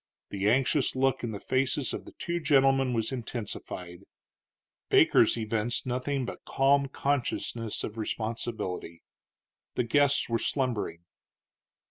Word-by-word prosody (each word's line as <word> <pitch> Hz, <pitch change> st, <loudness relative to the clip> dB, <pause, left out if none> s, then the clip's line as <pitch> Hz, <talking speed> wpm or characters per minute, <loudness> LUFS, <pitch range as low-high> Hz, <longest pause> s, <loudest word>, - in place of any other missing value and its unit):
The 100 Hz, +1 st, +1 dB
anxious 135 Hz, +4 st, +2 dB
look 130 Hz, -1 st, +1 dB
in 120 Hz, -, -1 dB
the 105 Hz, -2 st, -5 dB
faces 130 Hz, +2 st, 0 dB
of -, -, -5 dB
the -, -, -12 dB
two 170 Hz, 0 st, -3 dB
gentlemen 135 Hz, -4 st, +3 dB
was 115 Hz, 0 st, -1 dB
intensified; 105 Hz, -7 st, -6 dB, 0.9 s
Baker's -, -, +5 dB
evinced 115 Hz, +1 st, -1 dB
nothing 130 Hz, +2 st, -1 dB
but -, -, -7 dB
calm 140 Hz, +1 st, +3 dB
consciousness 130 Hz, -5 st, -2 dB
of 110 Hz, +1 st, -5 dB
responsibility. 110 Hz, -6 st, -4 dB, 0.7 s
The 125 Hz, -, +1 dB
guests 140 Hz, +4 st, +3 dB
were 115 Hz, -1 st, 0 dB
slumbering. 110 Hz, -, -1 dB
125 Hz, 120 wpm, -29 LUFS, 110-135 Hz, 0.9 s, Baker's